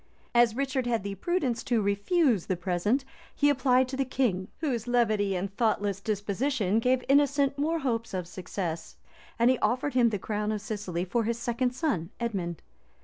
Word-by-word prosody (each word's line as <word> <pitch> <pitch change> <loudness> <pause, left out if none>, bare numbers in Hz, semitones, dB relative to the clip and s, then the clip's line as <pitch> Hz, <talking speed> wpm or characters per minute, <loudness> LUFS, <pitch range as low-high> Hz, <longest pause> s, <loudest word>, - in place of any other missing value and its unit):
As 240 -2 +4
Richard 265 -1 -1
had 230 -4 0
the 200 0 -3
prudence 255 - -1
to 240 -3 +2
refuse 210 - +2
the 185 - 0
present,[*] 185 +9 0 0.3
he 290 0 +4
applied 260 -2 +3
to 265 - -4
the 270 - +1
king, 235 -8 0
whose 250 -7 -2
levity 215 -5 +2
and 195 +2 -3
thoughtless 205 -4 +1
disposition 215 +1 0
gave 250 +2 +2
Innocent 280 0 +3
more 320 +3 +1
hopes 235 -6 -2
of 180 -2 -3
success; 175 -2 -5 0.4
and 235 +2 +5
he 260 - 0
offered 250 +6 0
him 245 -2 +4
the 210 - -1
crown 210 +2 -2
of 215 - -1
Sicily 200 -5 -3
for 225 +5 0
his 230 +1 -1
second 245 +1 -1
son, 255 - -1
Edmond. 190 -8 -3
230 Hz, 175 wpm, -28 LUFS, 200-260 Hz, 0.4 s, and